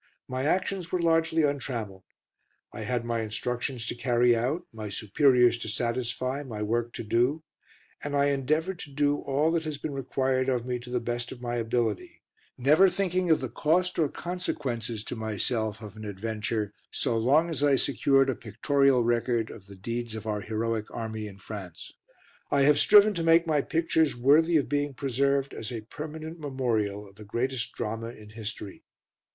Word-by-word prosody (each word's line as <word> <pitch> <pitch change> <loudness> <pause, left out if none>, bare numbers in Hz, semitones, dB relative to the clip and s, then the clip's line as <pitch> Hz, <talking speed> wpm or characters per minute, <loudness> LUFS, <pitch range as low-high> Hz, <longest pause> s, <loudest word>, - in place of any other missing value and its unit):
My 130 +1 -2
actions 185 +1 0
were 180 - +1
largely 165 -1 +2
untrammelled; 120 -9 -2 0.7
I - - -6
had 120 -2 -2
my 115 -1 -1
instructions 120 +3 -3
to - - -2
carry 120 0 +3
out; 130 +10 -1
my 110 -2 -6
superiors 120 +3 +3
to 110 - -5
satisfy; 125 +4 -2
my 110 -7 -5
work 120 +2 -1
to - - -5
do; 125 +8 +1 0.6
and 145 0 -2
I 140 0 +3
endeavoured 155 +7 0
to - - -8
do 145 +1 +2
all 145 +4 +1
that 165 -1 0
has 155 -2 -3
been 145 0 -5
required 130 -1 0
of 125 -2 0
me 125 -1 -2
to 120 +1 -11
the 125 0 0
best 120 0 -3
of 125 - -8
my 120 -1 -3
ability, 115 -3 -2 0.3
never 155 +9 +5
thinking 185 -2 0
of 160 - +4
the 130 - -2
cost, 170 +10 +1
or 155 -3 +3
consequences, 125 - -3
to - - -5
myself 110 0 -1
of 105 -1 -9
an 110 0 -8
adventure 105 +1 -3 0.2
so 115 - 0
long 145 +9 +3
as 155 - -3
I 145 -1 +5
secured 135 0 +3
a - - -4
pictorial 130 +4 +2
record 120 -1 0
of 100 -3 -12
the 100 - -11
deeds 115 +3 -4
of 110 - -7
our 105 -1 -2
heroic 110 0 -2
Army 110 -2 -5
in 100 -2 -11
France. 95 -4 -8 0.6
I 140 - +2
have 145 +1 +5
striven 210 +3 +7
to 170 -3 -2
make 165 +1 +5
my 155 -3 +2
pictures 160 -1 +1
worthy 155 +7 +5
of 145 - 0
being 145 +1 -1
preserved 140 +1 0
as 115 - -6
a 115 -2 -4
permanent 155 +7 -7
memorial 115 -8 -1
of 100 0 -19
the 110 - -10
greatest 120 +3 -2
Drama 115 +2 -4
in 110 -3 -11
history. 110 -2 -7
125 Hz, 180 wpm, -28 LUFS, 110-145 Hz, 0.7 s, striven